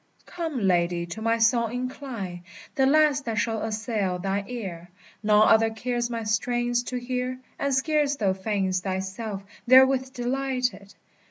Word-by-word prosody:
Come, 325 -6 -4
lady, 175 -1 +1
to 175 +6 -7
my 230 +1 +2
song 230 0 +2
incline, 245 -8 -5 0.3
The 265 -1 +3
last 295 -1 +3
that 225 -2 -2
shall 220 +1 0
assail 215 -4 -2
thine 195 +2 -2
ear. 185 -8 -6 0.3
None 210 0 +5
other 225 0 +5
cares 240 +1 -2
my 230 -1 -3
strains 240 +2 0
to 250 - -3
hear, 250 +1 -3 0.2
And 280 - 0
scarce 285 +1 +1
thou 200 -7 +1
feign'st 190 -1 -1
thyself 190 +2 -4 0.2
therewith 260 +1 +6
delighted! 250 -4 -2
230 Hz, 145 wpm, -26 LUFS, 200-255 Hz, 0.3 s, therewith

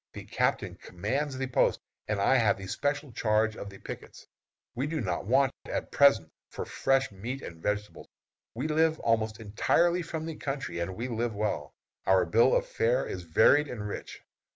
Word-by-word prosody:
The - - -8
captain - - -1
commands 135 +10 -3
the 130 - -1
post, 125 - +2 0.3
and 105 -1 -1
I 115 +6 +4
have 115 -4 +3
the 95 - -8
special 145 +7 -2
charge 110 -1 +1
of 100 - -7
the 100 - -12
pickets. - - -9 0.5
We 130 +4 -2
do 160 0 -2
not 95 -4 -2
want, 135 +2 +4
at - - -4
present, 140 - +5 0.2
for - - -5
fresh 135 -2 +1
meat 120 +8 -6
and 85 -1 -9
vegetables. 105 +2 -3 0.5
We 130 +6 -2
live 160 0 +2
almost 110 -1 +1
entirely 170 - +2
from 160 -1 -5
the 160 -2 -5
country, 135 -9 -4
and 85 +2 -3
we 120 +5 -3
live 115 -2 -2
well. 100 -9 -2 0.3
Our 95 -1 +5
bill 115 +9 +4
of - - +2
fare 125 +4 +1
is 90 - -5
varied 145 - +4
and 105 -6 -5
rich. 100 - -7
115 Hz, 180 wpm, -29 LUFS, 100-140 Hz, 0.5 s, present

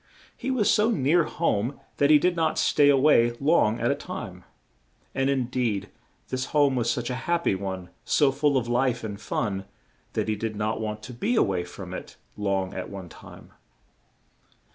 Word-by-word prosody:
He - - -5
was 250 -6 +3
so 215 +1 +3
near 165 - +3
home 130 -5 -1 0.2
that 140 - +3
he 155 - +8
did 180 +4 +1
not 160 -2 0
stay 145 -1 +4
a 140 - +5
way 125 -4 +4
long 140 -7 +3
at - - +1
a - - +3
time; - - -7 0.7
and 135 0 +1
in 135 -2 +1
deed, 115 -6 -2 0.4
this 130 0 -2
home 145 -2 +2
was 120 -2 0
such 120 +1 -1
a 125 +5 -5
hap 170 0 +2
py - - +2
one, 95 -2 -5
so 145 -3 +3
full 140 0 +2
of 120 -2 -1
life 125 0 +1
and 105 -2 -6
fun, 100 -3 -2 0.5
that - - -1
he 110 - 0
did 110 +1 -4
not 110 +1 -2
want 110 0 -4
to 125 - -8
be 210 - -1
a - - +5
way 90 -2 -1
from 90 - -9
it - - -8 0.2
long 95 -2 -1
at 90 - -5
one 95 -3 -8
time. - - -14
125 Hz, 195 wpm, -26 LUFS, 105-145 Hz, 0.7 s, he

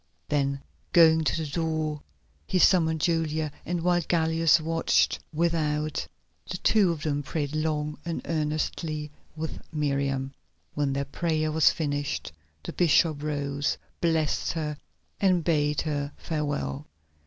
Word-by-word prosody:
Then 140 -1 0 0.3
going 160 -2 +6
to - - +1
the 160 -2 -2
door 155 -1 -2 0.5
he - - +1
summoned 160 -4 +4
Julia, 160 -2 0 0.2
and 175 -1 -1
while 175 0 +3
Gallus 165 0 +3
watched 165 +1 +2
without, 155 -2 0 0.4
the - - -3
two 205 -5 +3
of 160 -2 -5
them 145 -2 0
prayed 145 +1 -3
long 150 -1 -1
and 170 -1 -4
earnestly 155 -1 -2 0.2
with 160 0 -5
Miriam. 140 -3 -1 0.4
When 145 -2 0
their 140 +1 -1
prayer 155 +2 -1
was 160 0 +5
finished 145 -2 -2 0.3
the - - -6
bishop 160 -3 +3
rose, 145 -1 -1 0.2
blessed 160 -3 +1
her, 155 -3 -2 0.4
and 185 -4 +3
bade 150 -3 +1
her 145 -2 -2
farewell. 145 - -3
155 Hz, 130 wpm, -27 LUFS, 145-165 Hz, 0.5 s, going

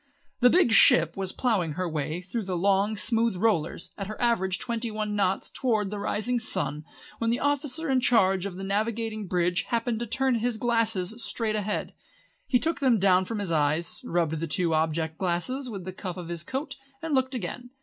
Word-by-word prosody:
The 245 - +6
big 345 -5 +4
ship 165 -6 +6
was 190 -1 -3
ploughing 195 - 0
her 185 +3 -2
way 155 +1 -3
through 200 +4 -4
the 185 -2 -2
long, 200 +3 +2
smooth 225 +2 +2
rollers 180 -5 0
at 195 - -4
her 215 - -7
average 190 -6 +1
twenty 235 -1 -3
one 215 -1 -3
knots 195 -2 0
towards 215 -6 0
the 210 - -4
rising 220 +4 -1
sun, 150 - -1 0.3
when 230 - 0
the 235 - +1
officer 290 +2 -1
in 265 -2 +3
charge 195 -6 +3
of 190 - -8
the 190 - -7
navigating 215 +1 -2
bridge 175 0 +1
happened 230 -1 -1
to 235 - -4
turn 265 +3 +1
his 240 0 0
glasses 225 -3 0
straight 220 -2 -1
ahead. 210 0 -2 0.5
He 250 - +4
took 325 +6 -1
them 255 -4 +3
down 185 -1 +3
from 225 +3 -4
his 200 -4 -3
eyes, 155 +2 +1
rubbed 165 -2 -1
the 165 - -3
two 170 +1 +1
object 160 0 -1
glasses 200 +9 -1
with 195 -5 -7
the 185 - -5
cuff 185 -1 -6
of 175 -2 -7
his 170 -1 -2
coat, 265 - -4 0.3
and 325 -2 -2
looked 260 0 +1
again. 245 +3 -5
205 Hz, 200 wpm, -27 LUFS, 180-235 Hz, 0.5 s, The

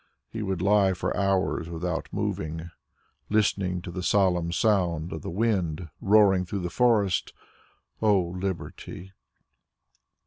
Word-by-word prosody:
He 110 - -4
would 95 -4 -2
lie 100 -1 +4
for 90 - -2
hours 95 -4 0
without 85 0 -3
moving, 80 +2 -3 0.6
listening 95 -4 +1
to 90 - -6
the 90 +1 -5
solemn 90 -3 +2
sound 90 -5 +1
of 80 - -5
the - - -5
wind 90 -5 -1
roaring 100 -2 +5
through 95 +2 -4
the 90 -1 -4
forest. 105 -5 +2 0.7
O 105 -3 +4
Liberty! 90 +1 -5
95 Hz, 125 wpm, -26 LUFS, 85-100 Hz, 0.7 s, roaring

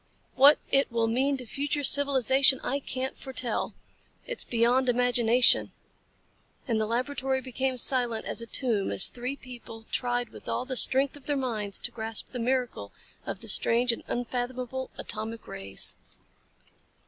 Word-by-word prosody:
What 280 +3 +6
it 275 -2 +2
will 230 -1 0
mean 265 +5 0
to 255 - -6
future 290 +4 -2
civilization 270 -1 +4
I 275 +2 -2
can't 260 -1 -4
foretell. 255 -4 -3 0.5
It's - - +1
beyond 245 +2 +1
imagination." 245 0 +3 0.9
And 225 -3 0
the 215 - -1
laboratory 265 +3 -2
became 260 0 -3
silent 240 -3 +2
as - - -2
a 230 - -7
tomb 225 -6 0
as - - +7
the - - -5
three 250 +2 -4
people 240 -4 -12
tried 245 -1 -1
with - - -11
all 250 - -2
the 260 0 -4
strength 265 +2 +4
of 285 - -14
their 290 -1 0
minds 215 -7 -1
to 240 - -3
grasp 225 -1 -4
the 250 - -6
miracle 240 - -2 0.4
of - - -5
the - - -6
strange 240 +1 +2
and 230 - -6
unfathomable 250 +1 -4
atomic 220 +1 -5
rays. 95 0 0
250 Hz, 155 wpm, -27 LUFS, 230-265 Hz, 0.9 s, as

